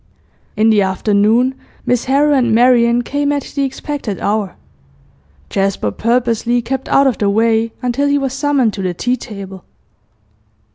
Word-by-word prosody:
In 220 Hz, +1 st, +4 dB
the 210 Hz, -2 st, +3 dB
afternoon, 210 Hz, +6 st, +1 dB, 0.3 s
Miss 245 Hz, -1 st, 0 dB
Harrow 285 Hz, +3 st, +2 dB
and 240 Hz, -5 st, +2 dB
Marian 240 Hz, 0 st, +4 dB
came 285 Hz, +3 st, -1 dB
at 285 Hz, -2 st, -1 dB
the 280 Hz, -, -2 dB
expected 270 Hz, -6 st, -4 dB
hour. 205 Hz, -3 st, -2 dB, 1.0 s
Jasper 195 Hz, -, -1 dB
purposely 235 Hz, -, 0 dB
kept 265 Hz, +2 st, -4 dB
out 275 Hz, -, +4 dB
of 260 Hz, -4 st, 0 dB
the 205 Hz, -, +1 dB
way 225 Hz, +2 st, +1 dB
until 250 Hz, +3 st, 0 dB
he 285 Hz, 0 st, +2 dB
was 270 Hz, -2 st, -2 dB
summoned 270 Hz, -5 st, +1 dB
to 200 Hz, -, -5 dB
the 180 Hz, -2 st, -2 dB
tea 245 Hz, +7 st, 0 dB
table. 195 Hz, -6 st, -9 dB
235 Hz, 150 wpm, -16 LUFS, 210-265 Hz, 1.0 s, In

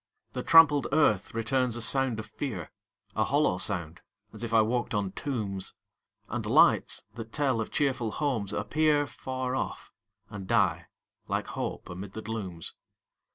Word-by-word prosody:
The 125 Hz, -, -3 dB
trampled 150 Hz, -4 st, +6 dB
earth 115 Hz, -10 st, +2 dB
returns 120 Hz, +1 st, +1 dB
a 120 Hz, -, -4 dB
sound 130 Hz, -1 st, +1 dB
of 110 Hz, -, -5 dB
fear 110 Hz, -, -5 dB, 0.4 s
A -, -, +3 dB
hollow 90 Hz, -, +2 dB
sound, 85 Hz, -5 st, -2 dB, 0.3 s
as -, -, -7 dB
if 115 Hz, -, -3 dB
I 110 Hz, -1 st, +5 dB
walked 120 Hz, 0 st, -1 dB
on 100 Hz, -2 st, 0 dB
tombs! 100 Hz, -5 st, -4 dB, 0.5 s
And -, -, -3 dB
lights, -, -, +4 dB
that 115 Hz, -1 st, -8 dB
tell 135 Hz, -6 st, +1 dB
of 110 Hz, -, -4 dB
cheerful 130 Hz, -6 st, 0 dB
homes, 125 Hz, -10 st, -1 dB
appear 155 Hz, -1 st, +2 dB
Far 130 Hz, -1 st, -4 dB
off, -, -, -4 dB, 0.4 s
and 105 Hz, -3 st, -8 dB
die -, -, +2 dB, 0.4 s
like -, -, -1 dB
hope -, -, -5 dB
amid 95 Hz, +2 st, -7 dB
the 110 Hz, -, -6 dB
glooms. 95 Hz, -7 st, -4 dB
115 Hz, 155 wpm, -29 LUFS, 100-135 Hz, 0.5 s, trampled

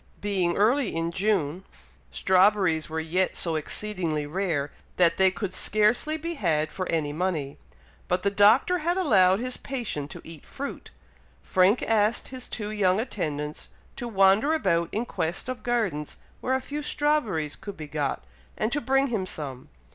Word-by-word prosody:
Being 190 Hz, -4 st, 0 dB
early 230 Hz, -, +2 dB
in 165 Hz, 0 st, -1 dB
June, 185 Hz, -3 st, 0 dB, 0.5 s
strawberries 185 Hz, -4 st, +3 dB
were 160 Hz, +1 st, -2 dB
yet 175 Hz, +4 st, 0 dB
so 170 Hz, -, 0 dB
exceedingly 160 Hz, -2 st, -2 dB
rare, 155 Hz, -3 st, -2 dB, 0.2 s
that 170 Hz, -2 st, +3 dB
they 190 Hz, 0 st, +5 dB
could 190 Hz, 0 st, -5 dB
scarcely 215 Hz, +12 st, +2 dB
be 335 Hz, +2 st, -4 dB
had 155 Hz, -, 0 dB
for 185 Hz, -, -4 dB
any 155 Hz, -3 st, 0 dB
money; 155 Hz, -5 st, -2 dB, 0.5 s
but 180 Hz, -, 0 dB
the 200 Hz, -, +2 dB
Doctor 220 Hz, -, +4 dB
had 345 Hz, +4 st, 0 dB
allowed 195 Hz, -, +4 dB
his 255 Hz, +1 st, -3 dB
patient 225 Hz, -, -4 dB
to -, -, -9 dB
eat 165 Hz, -3 st, -11 dB
fruit. 280 Hz, +1 st, -7 dB, 0.5 s
Frank 190 Hz, +5 st, +3 dB
asked 220 Hz, 0 st, +1 dB
his 255 Hz, -1 st, -5 dB
two 210 Hz, -2 st, -4 dB
young 195 Hz, -2 st, +2 dB
attendants 150 Hz, -, -4 dB, 0.3 s
to 240 Hz, -, -5 dB
wander 200 Hz, +7 st, +4 dB
about 170 Hz, -, +1 dB
in 225 Hz, +3 st, -2 dB
quest 170 Hz, -2 st, -2 dB
of 255 Hz, -1 st, -4 dB
gardens 210 Hz, -12 st, -1 dB, 0.2 s
where 260 Hz, -, 0 dB
a 260 Hz, -, -1 dB
few 290 Hz, +3 st, -5 dB
strawberries 265 Hz, -, 0 dB
could 200 Hz, -2 st, -9 dB
be 155 Hz, -1 st, -7 dB
got, 145 Hz, -, -2 dB, 0.3 s
and 215 Hz, +2 st, -1 dB
to 295 Hz, -, 0 dB
bring 270 Hz, +3 st, +2 dB
him 205 Hz, -6 st, -2 dB
some. 135 Hz, -7 st, -5 dB
190 Hz, 160 wpm, -26 LUFS, 165-235 Hz, 0.5 s, they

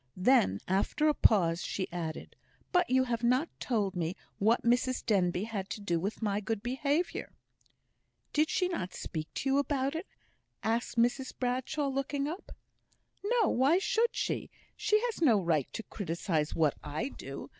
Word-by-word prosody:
Then, 185 Hz, -, +4 dB
after 195 Hz, +11 st, +1 dB
a 305 Hz, -, +5 dB
pause, 175 Hz, -, +3 dB
she 190 Hz, -, -2 dB
added, 165 Hz, -2 st, -5 dB, 0.4 s
"But 360 Hz, -1 st, +3 dB
you 260 Hz, +1 st, +4 dB
have 235 Hz, -2 st, -2 dB
not 255 Hz, +7 st, +3 dB
told 205 Hz, -6 st, 0 dB
me 170 Hz, +1 st, -1 dB, 0.2 s
what 220 Hz, +4 st, +3 dB
Mrs 245 Hz, +2 st, +1 dB
Denbigh 185 Hz, -4 st, +2 dB
had 205 Hz, -4 st, -4 dB
to -, -, -4 dB
do 175 Hz, -5 st, 0 dB
with 200 Hz, +6 st, -3 dB
my 205 Hz, -1 st, +1 dB
good 210 Hz, +1 st, -3 dB
behaviour." 280 Hz, +7 st, -1 dB, 1.0 s
"Did 305 Hz, +1 st, +3 dB, 0.2 s
not 185 Hz, -, -3 dB
she -, -, -8 dB
speak 155 Hz, -1 st, -5 dB
to -, -, -2 dB
you 275 Hz, -, +4 dB
about 280 Hz, -1 st, 0 dB
it?" 325 Hz, +4 st, -4 dB, 0.6 s
asked 230 Hz, +2 st, -1 dB
Mrs 245 Hz, +3 st, +1 dB
Bradshaw, 260 Hz, +4 st, -1 dB
looking 275 Hz, +1 st, -1 dB
up. 340 Hz, +6 st, -6 dB, 0.7 s
"No; 455 Hz, 0 st, +3 dB
why 275 Hz, +7 st, +4 dB
should 460 Hz, +4 st, +1 dB
she? -, -, -2 dB, 0.3 s
She 425 Hz, -, +2 dB
has 470 Hz, -6 st, -2 dB
no 235 Hz, -10 st, +5 dB
right 165 Hz, -7 st, 0 dB
to 225 Hz, -, -4 dB
criticise 165 Hz, -6 st, -2 dB
what 155 Hz, -3 st, +3 dB
I 150 Hz, -, -3 dB
do. -, -, -8 dB
235 Hz, 165 wpm, -31 LUFS, 185-280 Hz, 1.0 s, a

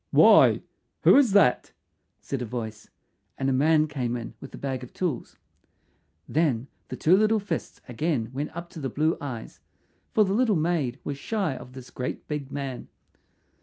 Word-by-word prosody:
"Why, -, -, +6 dB, 0.4 s
who -, -, +7 dB
is 260 Hz, -8 st, +5 dB
that?" 200 Hz, -11 st, +4 dB, 0.5 s
said 135 Hz, -2 st, -4 dB
a -, -, -2 dB
voice, 110 Hz, -2 st, -6 dB, 0.5 s
and 135 Hz, 0 st, 0 dB
a -, -, +1 dB
man 155 Hz, +3 st, +4 dB
came 125 Hz, -5 st, -2 dB
in 115 Hz, -, -7 dB
with 135 Hz, -, -9 dB
a -, -, -10 dB
bag 130 Hz, -2 st, -3 dB
of 125 Hz, -, -11 dB
tools. 165 Hz, -10 st, -3 dB, 0.9 s
Then 140 Hz, -7 st, +1 dB, 0.2 s
the -, -, -6 dB
two 170 Hz, +4 st, +4 dB
little 215 Hz, +2 st, +3 dB
fists 195 Hz, -5 st, -5 dB
again 125 Hz, -2 st, -1 dB
went 145 Hz, +3 st, -3 dB
up 170 Hz, 0 st, -7 dB
to -, -, -9 dB
the 135 Hz, -3 st, -3 dB
blue 155 Hz, +6 st, +1 dB
eyes, 125 Hz, -6 st, -7 dB, 0.5 s
for 215 Hz, -, +4 dB
the 190 Hz, -, -1 dB
little 225 Hz, -1 st, +3 dB
maid 155 Hz, -6 st, 0 dB
was 140 Hz, -1 st, -4 dB
shy 190 Hz, -4 st, -1 dB
of 125 Hz, 0 st, -11 dB
this 130 Hz, -1 st, -11 dB
great 125 Hz, -, -5 dB
big 145 Hz, -3 st, -4 dB
man. 135 Hz, -3 st, -5 dB
140 Hz, 175 wpm, -26 LUFS, 125-170 Hz, 0.9 s, who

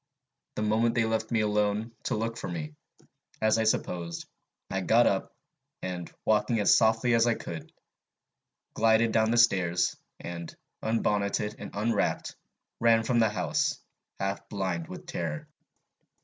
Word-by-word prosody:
The 105 Hz, -, -2 dB
moment 110 Hz, +2 st, +2 dB
they 115 Hz, -, +3 dB
left 110 Hz, 0 st, -1 dB
me 115 Hz, -2 st, +2 dB
alone, 105 Hz, +1 st, 0 dB
to -, -, 0 dB
look 115 Hz, +1 st, -2 dB
for -, -, -5 dB
me, 80 Hz, -4 st, -5 dB, 0.7 s
as 110 Hz, +1 st, +3 dB
I 110 Hz, -, +1 dB
supposed, 85 Hz, -5 st, -1 dB, 0.4 s
I -, -, -1 dB
got -, -, +4 dB
up, -, -, 0 dB, 0.5 s
and, 90 Hz, -2 st, -4 dB
walking 110 Hz, +1 st, +2 dB
as 105 Hz, -, +5 dB
softly 115 Hz, +2 st, +3 dB
as 115 Hz, +1 st, +4 dB
I 115 Hz, -, +3 dB
could, 85 Hz, -1 st, -7 dB, 1.0 s
glided 115 Hz, 0 st, +3 dB
down 110 Hz, 0 st, +3 dB
the 120 Hz, -, +2 dB
stairs, 90 Hz, -7 st, +3 dB, 0.2 s
and, 85 Hz, -1 st, -7 dB, 0.3 s
unbonneted 105 Hz, -1 st, 0 dB
and 100 Hz, -, -6 dB
unwrapped, 105 Hz, 0 st, 0 dB, 0.4 s
ran 115 Hz, -1 st, +4 dB
from 120 Hz, +1 st, +2 dB
the 110 Hz, -1 st, +4 dB
house, 95 Hz, -4 st, 0 dB, 0.4 s
half 100 Hz, 0 st, -3 dB
blind 95 Hz, -5 st, -2 dB
with -, -, -9 dB
terror. 80 Hz, -3 st, -4 dB
105 Hz, 145 wpm, -28 LUFS, 95-115 Hz, 1.0 s, as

